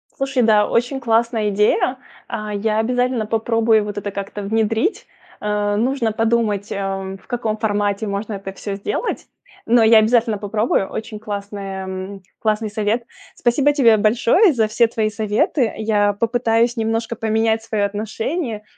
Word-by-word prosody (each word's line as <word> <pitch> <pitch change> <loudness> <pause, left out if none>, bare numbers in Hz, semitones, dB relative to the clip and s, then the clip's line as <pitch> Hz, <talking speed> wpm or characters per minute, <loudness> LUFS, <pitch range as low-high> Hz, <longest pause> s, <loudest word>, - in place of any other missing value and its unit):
Слушай, 270 -2 0
да, 215 -2 +4
очень 245 +3 0
классная 230 -2 +1
идея, 210 +5 +2 0.3
а, 215 -1 -5
я 215 +1 0
обязательно 245 0 0
попробую 225 0 +2
вот 205 0 -6
это 205 0 -4
как-то 200 +1 -6
внедрить, 220 - 0 0.4
э, 210 0 0
нужно 235 0 0
подумать, 220 -2 0
эм, 195 -1 -3
в - - -25
каком 230 -3 -2
формате 205 -1 -1
можно 205 +2 -3
это 195 -1 -6
всё 200 0 -5
сделать, 200 - -3 0.4
но 235 0 +5
я 220 0 +7
обязательно 225 -1 +2
попробую, 210 -1 0
очень 220 -1 -6
классная 195 -2 -6 0.2
классный 215 -1 0
совет. 215 +2 0 0.3
Спасибо 280 +4 +2
тебе 230 -6 +5
большое 235 - +4
за 225 -4 +2
все 230 +2 +3
твои 220 -1 -1
советы, 220 - 0
я 205 -2 +1
попытаюсь 230 +2 +1
немножко 225 +1 -1
поменять 220 0 +1
свое 215 -3 0
отношение, 220 - -3
220 Hz, 145 wpm, -20 LUFS, 205-230 Hz, 0.4 s, я